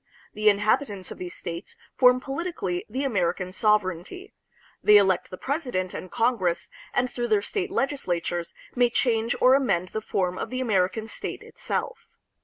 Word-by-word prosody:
The 215 0 +4
inhabitants 205 -1 +1
of - - -8
these 180 -1 -6
states 170 +2 -6 0.2
form 250 -1 +6
politically 270 - -3
the 260 +6 -2
American 185 -7 0
sovereignty. 210 - 0 0.5
They 210 0 +7
elect 190 -3 +3
the 185 - -8
president 250 - -2
and 185 - -6
Congress, 200 -8 0 0.2
and 250 - +1
through 240 -1 -3
their 210 -3 +2
state 400 - -2
legislatures 175 - -2 0.2
may 245 -1 +3
change 230 -1 +1
or 255 +1 +6
amend 195 -10 +2
the 220 - -4
form 185 -3 -1
of - - -3
the 255 - -3
American 215 -3 +1
state - - -5
itself. - - -4
215 Hz, 155 wpm, -26 LUFS, 185-255 Hz, 0.5 s, They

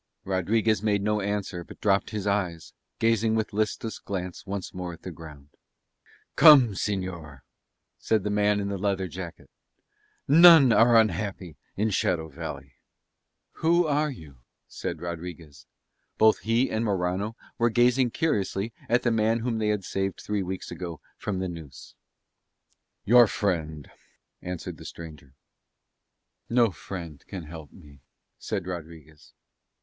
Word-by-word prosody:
Rodriguez 105 +3 +1
made 105 -2 +1
no 105 0 0
answer 100 -3 -3
but - - -14
dropped 100 -1 +1
his 105 -2 -4
eyes, 95 -5 -2 0.2
gazing 115 0 +2
with 110 -1 -2
listless 110 +1 -2
glance 90 -1 -6
once 100 -1 -5
more 90 -1 -5
at 85 - -14
the 90 - -6
ground. 75 -3 -12 0.9
"Come, 145 -7 +8
señor," 90 - -4 0.6
said 110 -3 +1
the 105 - -2
man 105 0 +2
in 100 0 -2
the 100 -1 -3
leather 95 -1 -1
jacket. 90 0 -8 0.8
"None 160 -4 +8
are 115 +1 +6
unhappy 95 -5 -1 0.2
in 105 +2 +1
Shadow 85 -4 0
Valley." 70 -4 -8 0.9
"Who 170 +2 +3
are 150 0 +1
you?" 80 - -11 0.3
said - - -6
Rodriguez. 80 -5 -8 0.5
Both 110 0 +5
he 115 +4 +1
and 110 +1 -1
Morano 100 +1 -1 0.2
were 120 0 +3
gazing 120 +2 +3
curiously 110 -6 -1 0.2
at 120 +2 +2
the 120 - +2
man 110 +1 +1
whom 115 -1 -2
they 110 - 0
had 105 -2 0
saved 95 +1 -3
three 105 -1 -2
weeks 95 0 -5
ago 85 -4 -6 0.2
from 100 -3 -4
the 95 0 -2
noose. 80 -7 -10 1.1
"Your 120 +1 +7
friend," 80 -8 -2 0.5
answered 90 -2 -6
the - - -12
stranger. 75 -5 -11 1.1
"No 115 -2 +3
friend 85 -6 -8
can 95 -3 -7
help 80 -1 -10
me," 70 -6 -17 0.4
said 100 -4 -4
Rodriguez. 80 -4 -9
100 Hz, 140 wpm, -26 LUFS, 85-110 Hz, 1.1 s, Come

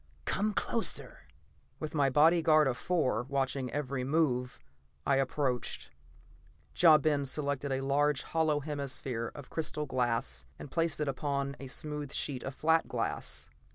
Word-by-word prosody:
Come 210 +1 0
closer!" 230 - -1 0.5
With 155 -1 -5
my 145 -3 +3
bodyguard 155 +2 +5
of 130 - 0
four 140 -9 0
watching 135 0 -1
every 140 -2 -2
move, 130 -4 +1 0.5
I 140 - +3
approached. 135 -2 -1 0.8
Ja 160 -3 +7
Ben 145 -1 +1
selected 140 0 -1
a 135 0 0
large 140 +1 +1
hollow 160 -2 +1
hemisphere 135 -5 -3
of 145 -3 -10
crystal 155 -1 -2
glass 115 - -1
and 145 - -9
placed 165 -3 0
it 150 - 0
upon 140 0 -2
a 135 - -7
smooth 150 +1 -4
sheet 135 -3 -2
of 135 - -6
flat 160 +1 +2
glass. - - -2
140 Hz, 140 wpm, -31 LUFS, 130-155 Hz, 0.8 s, Ja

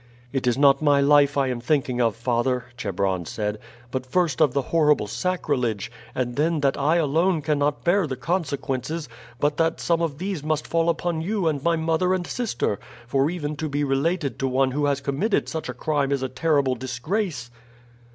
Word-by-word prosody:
"It 130 -2 -1
is 120 0 +2
not 140 0 +5
my 145 -2 +4
life 145 0 +4
I 135 -2 +2
am 125 -2 -2
thinking 130 -2 0
of, 115 -3 +2
father," 120 +1 0
Chebron 95 -5 -1
said, 105 +4 -3 0.3
"but 130 -1 -2
first 160 +2 0
of 150 -4 +5
the 140 +1 0
horrible 150 -7 +4
sacrilege, 125 - -1 0.2
and 120 -1 -2
then 155 +1 +1
that 140 -1 +2
I 150 +4 +2
alone 165 +1 +2
cannot 145 -1 0
bear 175 0 +3
the 130 - -3
consequences, 150 -1 -2 0.3
but 145 0 +1
that 165 0 +1
some 170 -1 +1
of 155 -4 -1
these 185 -1 -3
must 155 0 -1
fall 165 0 +1
upon 165 0 -1
you 195 0 -1
and 150 -3 0
my 170 +3 +2
mother 165 +3 +1
and 180 -1 -3
sister; 175 - -2 0.3
for 135 +4 +1
even 155 -4 -3
to 155 0 -3
be 145 +1 -1
related 140 0 0
to 135 - 0
one 130 +1 +2
who 145 +2 0
has 140 -1 0
committed 145 +10 0
such 160 -5 -4
a - - -3
crime 145 0 0
is 140 -2 0
a 130 - -2
terrible 140 0 +1
disgrace." 130 - -3
145 Hz, 190 wpm, -24 LUFS, 130-165 Hz, 0.3 s, not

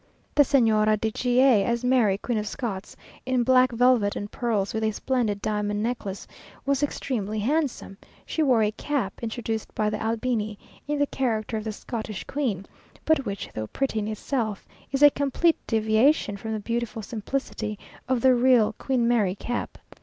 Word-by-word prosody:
The 295 - +5
Señora 215 -6 +3
de 220 0 -1
G 245 +2 +1
a, 250 -7 +5
as 235 +3 -1
Mary, 245 -6 +3
Queen 230 +1 -2
of 210 - -4
Scots, 215 -5 -5 0.3
in 255 -1 +1
black 255 0 +4
velvet 240 -3 +3
and 205 0 -5
pearls, 220 -5 -1
with 220 0 -1
a 220 - +2
splendid 220 -3 -1
diamond 210 0 -1
necklace, 225 -5 -3 0.4
was 280 0 +1
extremely 220 -7 -2
handsome; 255 -4 -1 0.3
she 320 - -2
wore 255 -7 +4
a 210 - +1
cap, 250 -3 -3
introduced 225 -1 -4
by 210 -1 +1
the - - -3
Albini, 220 -2 -1 0.3
in 295 0 -1
the 285 - +3
character 230 -6 -2
of 215 - -5
the 220 - -2
Scottish 215 -1 -5
Queen, 230 -10 -2 0.4
but 310 -4 +2
which, 200 -1 -4
though 110 0 -4
pretty 270 - -1
in 210 - -3
itself, 215 -1 -3 0.2
is 275 +1 +1
a 290 - +9
complete 285 +5 +1
deviation 220 +2 +2
from 220 +2 -5
the 215 - -2
beautiful 230 +1 -3
simplicity 220 -1 -4 0.3
of 255 -2 +1
the 260 +1 +6
real 245 -3 +4
Queen 250 -3 +1
Mary 210 -6 +2
cap. 240 +4 -4
230 Hz, 175 wpm, -25 LUFS, 215-255 Hz, 0.4 s, a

